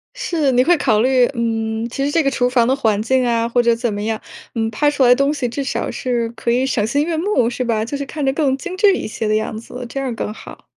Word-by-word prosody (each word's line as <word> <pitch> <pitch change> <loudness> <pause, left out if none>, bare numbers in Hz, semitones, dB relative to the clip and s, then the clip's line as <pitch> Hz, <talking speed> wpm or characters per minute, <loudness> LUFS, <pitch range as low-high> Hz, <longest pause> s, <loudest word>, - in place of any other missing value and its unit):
是， 310 -6 0
你 250 0 +4
会 350 +5 +4
考 225 -7 +2
虑， 255 0 +4
嗯， 225 0 -1
其 275 +3 -3
实 285 - 0
这 325 -1 +2
个 275 - +1
厨 250 -1 +1
房 240 -2 +3
的 265 - +2
环 220 -6 +1
境 255 +3 +1
啊 230 -1 +1
或 240 +1 +2
者 235 -1 +3
怎 230 -2 -2
么 205 - -4
样， 220 +1 -2 0.4
嗯， 225 0 0
拍 295 +7 +2
出 290 -2 +1
来 245 -1 +7
东 275 +3 +1
西 270 -4 -2
至 275 +4 -3
少 270 - -2
是 240 -2 -1
可 235 0 -5
以 250 +2 +2
赏 225 -5 0
心 285 +6 0
悦 335 - -2
目 320 - +1
是 250 +1 -3
吧？ 225 -2 0
就 285 - -5
是 280 - -4
看 295 0 -4
着 270 - +2
更 275 -3 +1
精 370 +4 -6
致 400 0 +4
一 - - -4
些 215 0 -4
的 215 - +2
样 215 0 -2
子， 245 +2 -8
这 275 - -5
样 270 -1 -2
儿 235 - -4
更 210 - -4
好。 - - -12
245 Hz, 305 characters per minute, -19 LUFS, 230-275 Hz, 0.4 s, 来